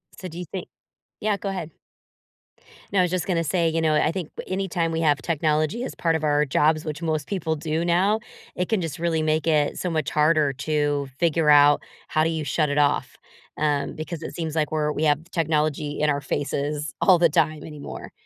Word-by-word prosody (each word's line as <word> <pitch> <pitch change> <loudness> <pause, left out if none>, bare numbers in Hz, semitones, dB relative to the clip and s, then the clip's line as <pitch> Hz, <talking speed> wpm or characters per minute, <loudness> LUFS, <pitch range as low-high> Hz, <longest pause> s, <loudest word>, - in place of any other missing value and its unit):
So, 185 - -7
do 170 -1 -9
you 180 - -5
think 180 +3 -6 0.5
Yeah, 210 -1 +1
go 195 - -4
ahead. 175 -4 -4 1.2
No, 195 - +3
I - - +6
was 180 -1 +1
just 180 -2 -1
gonna 170 -3 +1
say, 165 +1 +1
you 165 0 0
know, 155 -1 +2
uh, - - +4
I 155 - +2
think, 180 -4 -4 0.2
anytime 185 -3 -1
we 165 0 -1
have 145 -4 +2
technology 155 - 0
as - - -5
part 165 -1 +1
of 160 - -2
our 150 0 +3
jobs, 155 +3 +2
which 155 +1 -5
most 155 -3 -1
people 160 -5 -1
do 160 +2 -2
now, 190 +5 +2 0.4
it 180 - -2
can 220 - +2
just 165 -1 -4
really 165 -2 0
make 155 +1 +1
it 150 -3 +2
so 180 - -2
much 155 -4 -1
harder 150 -2 +3
to 145 0 -1
figure 165 -2 +2
out 145 0 +6 0.3
how 155 - +1
do 160 - +2
you 160 -2 -2
shut 150 +2 +1
it 145 - -1
off, 145 -1 +1 0.4
um, 150 -2 0
because 160 +1 -6
it - - -6
seems 160 -2 -4
like 155 -1 0
we're 150 -1 0
we 155 - -2
have 150 -1 +3
technology 150 -2 0
in 150 0 +2
our 140 -1 0
faces 145 +1 -2
all 185 -3 +6
the 170 - +5
time 155 0 +1
anymore. 150 -2 -8
155 Hz, 215 wpm, -24 LUFS, 150-170 Hz, 1.2 s, I